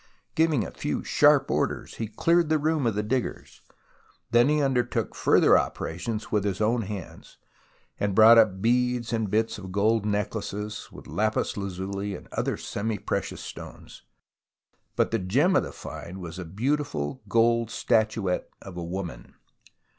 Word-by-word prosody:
Giving 155 -9 +2
a - - -7
few - - -3
sharp - - +4
orders, - - -2
he 110 - -3
cleared 165 +9 +2
the 155 - +3
room 155 -3 +1
of 110 - 0
the 105 - 0
diggers. 125 +4 -3 0.7
Then 120 +3 +5
he 150 0 +2
undertook 135 -4 0
further - - +5
operations 105 +7 -4
with 105 -2 +1
his 100 -2 -2
own 115 +2 +2
hands, 100 -4 -8 0.6
and 100 -2 0
brought 115 +2 +9
up 95 -4 +2
beads 125 0 +1
and 110 -3 0
bits 110 +1 0
of 95 -2 -8
gold 105 +3 +2
necklaces, 105 0 -3
with - - -12
lapis 110 +9 -1
lazuli 100 +1 -4
and - - -11
other - - -1
semi 110 +1 -3
precious - - -3
stones. - - -10 0.9
But - - +1
the 115 - +1
gem 135 - +2
of - - +5
the - - -6
find 90 +3 -8
was 85 0 -7
a 90 - -5
beautiful 105 - -2
gold 115 +1 +3
statuette 110 -5 0
of 95 -2 -10
a 85 - -4
woman. 90 0 -6
110 Hz, 155 wpm, -26 LUFS, 95-120 Hz, 0.9 s, brought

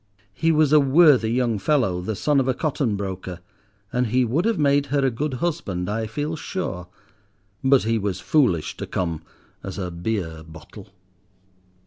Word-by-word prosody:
He 165 +9 +1
was 155 -2 +3
a 150 - +8
worthy 140 -4 +5
young 120 -3 0
fellow, 100 -9 +1
the 105 +4 -3
son 145 +6 +2
of 135 - 0
a 130 - +1
cotton 140 -7 -1
broker, 95 -2 -5 0.5
and 125 0 +1
he 125 +3 +2
would 140 - 0
have 230 -3 +1
made 140 -1 +2
her 140 0 +1
a 130 - +2
good 140 +4 -3
husband, 120 - -2
I 110 +1 -2
feel 150 +7 -3
sure. 100 - -5 0.8
But 135 0 +4
he 115 +1 0
was 100 -3 -2
foolish 120 - +1
to - - -5
come 85 -4 -2 0.4
as 95 - -6
a 90 -3 -4
beer 85 -2 -3
bottle. 80 +5 -13
120 Hz, 170 wpm, -23 LUFS, 95-145 Hz, 0.8 s, a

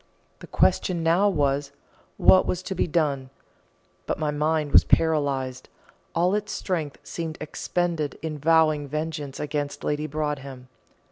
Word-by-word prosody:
The - - -11
question 175 -4 +1
now 175 +5 +4
was, 140 -4 0 0.5
What 185 - +6
was 180 0 -2
to 190 - -4
be 185 - 0
done? 145 -5 0 0.8
But - - -1
my 155 -1 -1
mind 150 0 0
was - - +7
paralysed 140 -5 +1 0.5
all 175 +3 +2
its 210 0 -2
strength 160 -7 -3
seemed 160 -2 -5
expended 155 -1 -2
in 155 -2 -4
vowing 155 -1 +3
vengeance 150 -1 -4
against 145 -1 -3
Lady 150 +1 -1
Broadhem. 140 -4 -4
155 Hz, 135 wpm, -25 LUFS, 145-165 Hz, 0.8 s, was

